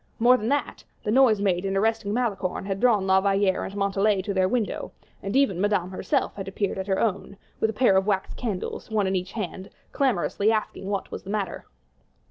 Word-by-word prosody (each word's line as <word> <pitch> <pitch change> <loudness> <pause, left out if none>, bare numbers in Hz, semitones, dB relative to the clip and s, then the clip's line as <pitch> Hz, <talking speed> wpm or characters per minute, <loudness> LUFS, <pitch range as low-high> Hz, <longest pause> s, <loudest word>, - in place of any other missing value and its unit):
More 245 +2 +6
than 225 -2 -2
that, 285 +1 -1 0.2
the 210 - -1
noise 235 -4 +5
made 185 -3 +1
in 195 0 -1
arresting 220 0 0
Malicorne 205 -6 -1
had 195 -1 -3
drawn 220 -5 +3
La 190 0 +4
Valliere 195 -1 +1
and 195 - -7
Montalais 200 0 +1
to 200 - -3
their 190 -1 +2
window; 235 -3 -2 0.3
and 195 +3 -4
even 265 -10 +2
Madame 200 -3 +1
herself 265 +8 -1
had 195 -1 -7
appeared 195 0 -2
at 190 - -4
her 190 -1 +1
own, 200 -2 -2 0.2
with 220 - +2
a - - -3
pair 225 -3 +3
of 190 +1 +2
wax 195 -2 0
candles, 215 -4 -4
one 215 -2 +1
in 190 0 0
each 185 +1 -3
hand, 195 -3 -5 0.2
clamorously 225 -5 +1
asking 215 -3 -2
what 200 -2 -3
was - - -5
the 190 - -11
matter. 200 -3 -3
200 Hz, 210 wpm, -25 LUFS, 190-220 Hz, 0.3 s, More